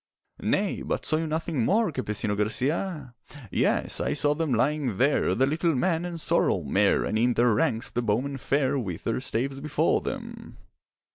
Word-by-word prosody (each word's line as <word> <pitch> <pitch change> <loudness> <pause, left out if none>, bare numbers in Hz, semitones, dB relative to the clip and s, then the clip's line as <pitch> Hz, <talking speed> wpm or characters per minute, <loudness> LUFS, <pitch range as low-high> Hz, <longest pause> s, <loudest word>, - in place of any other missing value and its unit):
'Nay, - - 0
but - - -3
saw 155 - +2
you 160 0 -2
nothing 155 -4 -1
more, 210 - +2
Campesino 105 -6 -2
Garcia?' 135 - -1 0.4
'Yes, - - 0
I - - 0
saw 145 0 +2
them 160 -1 -2
lying 130 -2 0
there, 140 +5 +2
The 130 - +3
little 160 +3 0
man 170 +4 0
and 170 -1 -5
sorrel - - +1
mare; - - +2
And 110 - -1
in 120 +1 +2
their 120 -1 +4
ranks 115 0 0
the 120 - -1
bowmen 125 +5 -1
fair, 140 +1 0
With 90 -9 -5
their 115 - -1
staves 135 +2 -2
before 150 +1 +1
them. - - -7
135 Hz, 170 wpm, -26 LUFS, 120-155 Hz, 0.4 s, their